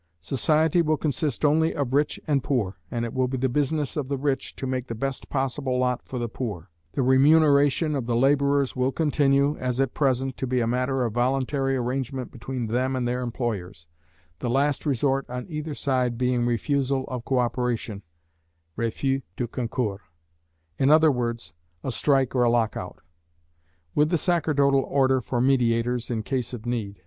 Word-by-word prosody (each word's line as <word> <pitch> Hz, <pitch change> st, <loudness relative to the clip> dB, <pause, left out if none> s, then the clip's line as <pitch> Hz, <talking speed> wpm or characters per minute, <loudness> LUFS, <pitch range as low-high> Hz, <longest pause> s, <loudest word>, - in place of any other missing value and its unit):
Society 155 Hz, -, +2 dB
will 155 Hz, -1 st, +1 dB
consist 150 Hz, +1 st, -1 dB
only 160 Hz, +2 st, +3 dB
of 135 Hz, -3 st, -2 dB
rich 145 Hz, +2 st, +1 dB
and 140 Hz, -4 st, +1 dB
poor, 110 Hz, -10 st, -1 dB
and 120 Hz, 0 st, -2 dB
it 115 Hz, -, -6 dB
will 130 Hz, -1 st, +1 dB
be 130 Hz, +1 st, -3 dB
the 130 Hz, +1 st, +1 dB
business 145 Hz, +2 st, -1 dB
of 145 Hz, -4 st, -2 dB
the 140 Hz, -, -1 dB
rich 135 Hz, 0 st, -2 dB
to -, -, -5 dB
make 130 Hz, -1 st, -2 dB
the 115 Hz, -, -4 dB
best 135 Hz, +3 st, -4 dB
possible 135 Hz, -1 st, -1 dB
lot 125 Hz, -1 st, 0 dB
for 130 Hz, -, -5 dB
the 120 Hz, -1 st, -2 dB
poor. 100 Hz, -7 st, -6 dB, 0.2 s
The 135 Hz, -, 0 dB
remuneration 145 Hz, +3 st, +4 dB
of 135 Hz, -5 st, -2 dB
the 120 Hz, -, 0 dB
labourers 140 Hz, +1 st, +2 dB
will 130 Hz, +1 st, +1 dB
continue, 140 Hz, -1 st, +2 dB
as 125 Hz, 0 st, -2 dB
at 135 Hz, -2 st, +1 dB
present, 135 Hz, -2 st, 0 dB
to 130 Hz, -, -3 dB
be 125 Hz, 0 st, +1 dB
a 115 Hz, -, +1 dB
matter 125 Hz, +2 st, 0 dB
of 115 Hz, -, -3 dB
voluntary 135 Hz, +2 st, 0 dB
arrangement 130 Hz, +1 st, -3 dB
between 125 Hz, +1 st, -5 dB
them 130 Hz, +4 st, 0 dB
and 125 Hz, -1 st, -1 dB
their 125 Hz, +1 st, -1 dB
employers, 110 Hz, -9 st, -4 dB, 0.5 s
the 120 Hz, -, -2 dB
last 140 Hz, +4 st, +1 dB
resort 135 Hz, 0 st, 0 dB
on 125 Hz, 0 st, -5 dB
either 150 Hz, -2 st, -5 dB
side 125 Hz, -4 st, 0 dB
being 125 Hz, -1 st, +1 dB
refusal 135 Hz, +2 st, 0 dB
of 125 Hz, -2 st, -5 dB
co 130 Hz, -, 0 dB
operation, 120 Hz, -4 st, -1 dB, 0.7 s
"refus 135 Hz, +4 st, -1 dB, 0.2 s
de 120 Hz, -, -1 dB
concours," 115 Hz, -4 st, -3 dB, 0.8 s
in 135 Hz, -, +3 dB
other 155 Hz, 0 st, +6 dB
words, 120 Hz, -, -3 dB, 0.3 s
a 130 Hz, -, -2 dB
strike 135 Hz, +2 st, +1 dB
or 125 Hz, -, +2 dB
a 120 Hz, -, +4 dB
lock 115 Hz, -2 st, +1 dB
out; -, -, -7 dB, 0.9 s
with 150 Hz, +1 st, +3 dB
the 170 Hz, -, +2 dB
sacerdotal 145 Hz, -5 st, +2 dB
order 130 Hz, -1 st, +2 dB
for 120 Hz, +2 st, -2 dB
mediators 120 Hz, -2 st, +1 dB
in 115 Hz, -3 st, -2 dB
case 130 Hz, 0 st, -2 dB
of 120 Hz, -2 st, -7 dB
need. 110 Hz, -5 st, -3 dB
130 Hz, 180 wpm, -25 LUFS, 120-140 Hz, 0.9 s, other